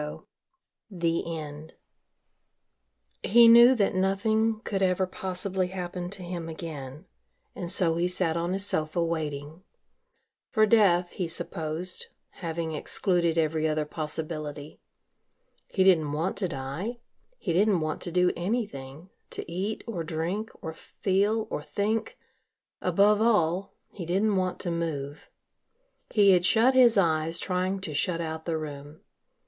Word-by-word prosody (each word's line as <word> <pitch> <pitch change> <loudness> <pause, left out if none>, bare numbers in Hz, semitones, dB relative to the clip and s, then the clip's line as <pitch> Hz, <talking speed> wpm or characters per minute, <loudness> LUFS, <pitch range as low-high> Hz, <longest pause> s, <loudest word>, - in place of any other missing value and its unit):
IX 150 0 -6 0.7
THE 170 -3 -1
END 150 +1 -8 1.5
He 235 +2 +6
knew 235 +3 +8
that 205 -5 +1
nothing 215 +4 +1
could 195 -4 -3
ever 185 0 +2
possibly 185 0 -2
happen 180 -1 -5
to 190 -1 -8
him 175 -2 -5
again 155 -2 -7 0.5
and 175 - -5
so 170 -3 +2
he 175 +1 +1
sat 180 -2 -1
on 170 +2 -1
his 195 +1 +1
sofa 160 -1 0
waiting 155 -1 -4 0.9
for 215 -3 +4
death, 190 -5 +4
he 180 - -3
supposed, 165 +1 -3 0.3
having 165 -1 -3
excluded 170 +1 +1
every 160 0 +1
other 155 0 0
possibility. 155 -1 -5 0.9
He 190 - +1
didn't 160 -6 +4
want 165 +6 -1
to 195 - 0
die, 165 - -5 0.4
he 175 - -2
didn't 195 0 +3
want 155 -1 -3
to 175 - -5
do 180 +1 +3
anything, 175 - -4 0.2
to - - -6
eat 195 +5 -3
or 190 -8 -4
drink 170 +8 -3
or 160 - -4
feel 205 +6 0
or - - -2
think 220 - -2 0.6
above 205 +1 +3
all, 195 -4 +2 0.2
he 175 -5 -7
didn't 200 +4 +2
want 185 -1 0
to 175 - -2
move. 150 -4 -4 0.8
He 205 -3 +5
had 180 -2 +4
shut 230 +7 +4
his 245 -4 +6
eyes 165 -2 +2
trying 185 +1 -1
to 160 -5 -5
shut 170 +3 0
out 160 -1 -4
the 165 -2 -1
room. 145 0 -8
175 Hz, 140 wpm, -27 LUFS, 160-195 Hz, 1.5 s, knew